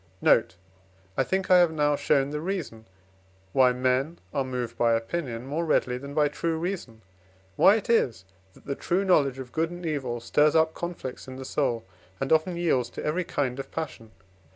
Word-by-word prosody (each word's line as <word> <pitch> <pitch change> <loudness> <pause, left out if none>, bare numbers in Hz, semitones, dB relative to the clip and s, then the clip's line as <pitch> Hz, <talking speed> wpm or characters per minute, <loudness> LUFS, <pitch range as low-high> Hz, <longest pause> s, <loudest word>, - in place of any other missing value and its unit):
Note. - - +3 0.6
I 135 - +2
think 190 +5 -1
I 180 - +8
have 175 -2 +4
now 150 -2 +2
shown 140 -1 +1
the 150 0 -3
reason, 160 - -4 0.7
why 130 -1 +5
men 130 +6 0 0.2
are 140 -2 +1
moved 125 -3 -4
by 115 -1 +3
opinion 115 0 -3
more 150 +5 -2
readily 125 -6 +1
than 140 +2 -8
by 150 -1 +4
true 160 +3 -2
reason, 160 - -5 0.5
why 200 - +6
it 220 - -3
is 125 - +1 0.3
that - - -20
the 140 - -2
true 180 +7 -1
knowledge 140 -8 +3
of 130 -2 -8
good 160 0 0
and 175 0 -8
evil 135 -7 -2
stirs 150 +6 +2
up 160 0 +4
conflicts 170 -8 -6
in 130 - -8
the 130 0 -7
soul, 120 -5 -1 0.3
and 135 +3 +1
often 170 +3 +2
yields 135 -9 +1
to - - -7
every 165 +4 0
kind 135 -6 -2
of 135 - -6
passion. 150 -8 -6
145 Hz, 190 wpm, -26 LUFS, 125-165 Hz, 0.7 s, I